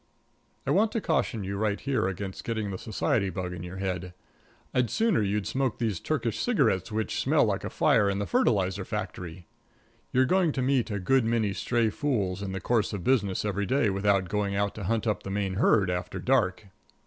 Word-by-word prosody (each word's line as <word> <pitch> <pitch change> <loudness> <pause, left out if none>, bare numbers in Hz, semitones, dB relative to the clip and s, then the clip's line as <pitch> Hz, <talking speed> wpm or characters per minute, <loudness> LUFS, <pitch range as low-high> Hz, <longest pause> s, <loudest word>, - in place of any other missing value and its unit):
I - - 0
want 215 +2 +3
to 230 - +1
caution 155 - 0
you 100 +1 -3
right 105 -1 0
here 135 -8 0
against 95 0 -5
getting 110 -3 -2
the 95 - -5
society 110 -1 0
bug 90 0 -4
in 85 - -7
your 90 +2 -7
head. 90 -2 -3 0.6
I'd 125 -2 +2
sooner 220 - +2
you'd 100 0 0
smoke 130 +2 -1
these 110 -7 -1
Turkish 120 -8 -2
cigarettes 120 - +1
which 110 0 -2
smell - - +3
like - - -1
a - - -3
fire 105 -3 +3
in 100 - -1
the 100 - -1
fertilizer 95 0 +1
factory. 90 -1 -5 0.7
You're 130 +1 +4
going 180 0 +2
to 130 - -1
meet 130 -2 +1
a 105 - -2
good 130 +7 +2
many 110 -3 +1
stray 115 +1 0
fools 100 -9 -1
in 100 -1 -4
the 95 - -3
course 110 +2 0
of 100 -4 -4
business 105 -5 +1
every 100 -1 -1
day 130 -6 +2
without 100 -1 +1
going 100 +1 -1
out 100 0 0
to 100 - -6
hunt 115 +3 0
up 105 -4 0
the - - -7
main 95 -1 -2
herd 100 -3 +3
after 90 +1 -3
dark. 105 -6 +1
105 Hz, 205 wpm, -28 LUFS, 95-120 Hz, 0.7 s, You're